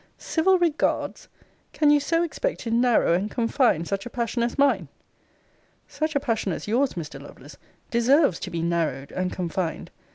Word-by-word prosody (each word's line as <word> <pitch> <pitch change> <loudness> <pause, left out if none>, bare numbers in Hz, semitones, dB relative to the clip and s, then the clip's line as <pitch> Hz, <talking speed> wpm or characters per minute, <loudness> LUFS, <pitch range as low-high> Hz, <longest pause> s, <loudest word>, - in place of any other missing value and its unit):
Civil 370 +3 +2
regards! 335 -4 -1 0.5
Can 295 -1 +3
you 295 - +5
so 330 +4 +1
expect - - -3
to 230 - -4
narrow 235 -6 +3
and 190 +5 0
confine 230 - +1
such 195 +2 -3
a - - -7
passion 235 0 -2
as 235 +3 -1
mine? 250 - +2 1.0
Such 310 0 -3
a - - +4
passion 225 -7 -1
as - - -5
yours, 255 +5 +1
Mr. 150 -5 -7
Lovelace, 140 0 -13 0.3
deserves 245 - +3
to - - -5
be 170 -2 -3
narrowed 160 -5 -1
and 185 0 -2
confined. 175 -1 -3
230 Hz, 165 wpm, -25 LUFS, 170-285 Hz, 1.0 s, you